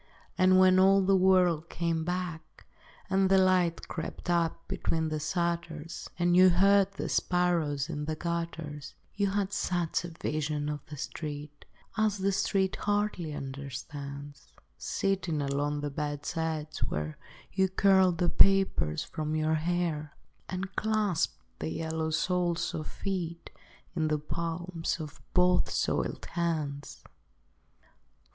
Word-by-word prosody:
And 185 0 +5
when 185 0 +6
all 195 +1 +6
the 195 +1 +4
world 180 -3 +3
came 165 -1 -1
back 175 -1 -5 0.4
And 190 0 +2
the 195 - +6
light 185 -3 +3
crept 170 +1 -4
up 170 -1 0
between 160 -1 -1
the 155 0 -2
shutters, 170 0 -3
And 175 0 +3
you 185 +1 +8
heard 195 +2 +4
the 195 - -4
sparrows 170 -6 +1
in 150 -3 -4
the 155 +1 -2
gutters, 165 -4 -4 0.2
You 200 -1 +1
had 200 0 -1
such 175 -4 0
a - - -4
vision 150 -2 -2
of 150 -1 -3
the 150 - -8
street 150 0 -6 0.3
As 215 -1 +2
the 195 +1 +1
street 190 0 +1
hardly 205 -6 -1
understands; 140 +1 -7 0.2
Sitting 190 -5 -1
along 145 +1 -1
the 145 -1 -3
bed's 145 +2 -3
edge, 160 -1 -2
where 75 0 -3 0.3
You 190 0 +2
curled 190 -2 +4
the 175 +1 +2
papers 190 - +4
from 155 -1 -3
your 155 0 +1
hair, 160 -2 -1 0.4
Or 185 0 -2
clasped 215 -6 +1 0.2
the 80 - -3
yellow 160 - -2
soles 175 +1 0
of 155 -1 -4
feet 175 -4 -4 0.4
In 160 -2 +1
the 155 0 +1
palms 165 +2 -3
of 155 -2 -8
both 180 0 +4
soiled - - -1
hands. 155 -5 -2
170 Hz, 135 wpm, -30 LUFS, 150-185 Hz, 0.4 s, you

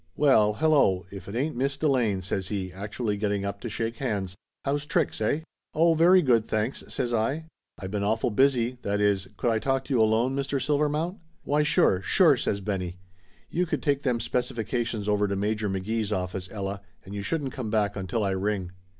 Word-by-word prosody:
"Well, 110 -8 +5
hello, 135 - +3
if 100 -2 -9
it 100 - -6
ain't 140 +5 -1
Miss 135 +3 0
Delane!" 120 -11 +1
says 95 +1 -2
he, 95 -3 -3
actu 105 +5 -6
ally 105 -3 0
getting 100 -1 -1
up 100 0 -4
to 120 - -4
shake 115 +1 -3
hands. 100 -8 -2 0.3
"How's 145 +1 -1
tricks, 160 -6 0
eh 140 +8 +1 0.2
?" - - -58
"Oh, 165 +2 +5
very 175 +3 +6
good, 115 -5 +3
thanks," 110 +4 -1
says 120 -2 -2
I. 135 +8 0 0.3
"I - - -8
been 100 +1 -2
awful 110 +3 +1
busy 125 0 +2
that 100 0 -1
is, 100 -2 +2
I - - -21
could 120 - +1
I 110 - +1
talk 135 +2 0
to 140 - -3
you 120 - +4
alone, 115 +4 +2
Mr. 140 0 -1
Silver 150 +2 +1
mount 165 +6 -2
?" - - -40
"Why, 145 +1 +2
sure! 150 -10 +3
Sure!" 160 - +5
says 100 -4 -2
Benny. 95 -3 -3 0.5
"You 180 +1 0
could - - -2
take 140 -2 +1
them 125 -4 0
specifications 115 -2 -2
over 105 0 +2
to 100 - -1
Major 105 +1 -1
McGee's 105 +3 -2
office, 90 -1 -3
Ella, 100 -1 -4 0.2
and 95 - -9
you 100 - -3
shouldn't 140 +3 -2
come 125 -5 -4
back 105 -2 +1
until 95 +3 -2
I 100 - +1
ring." 95 -1 -1
110 Hz, 210 wpm, -27 LUFS, 100-135 Hz, 0.5 s, very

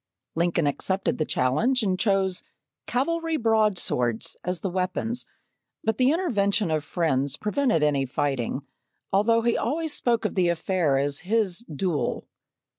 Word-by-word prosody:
Lincoln 170 -1 +1
accepted 190 +7 -1
the 155 - +1
challenge 220 - +1
and 185 -3 0
chose 195 -3 +1 0.5
"cavalry 325 +5 0
broadswords" 210 - +1
as 180 -2 -2
the 195 - -1
weapons, 190 +6 -1 0.6
but 220 +1 0
the 255 +1 +5
intervention 210 - +1
of 155 -1 0
friends 140 -5 0
prevented 215 - +1
any 140 -3 +2
fighting, 130 -1 -1 0.5
although 230 +3 +3
he 235 0 +2
always 310 +5 -1
spoke 235 -2 +1
of - - 0
the 180 -3 +2
affair 170 -4 +1
as 140 +1 0
his 200 -1 0
"duel." 155 0 -2
190 Hz, 135 wpm, -25 LUFS, 155-230 Hz, 0.6 s, the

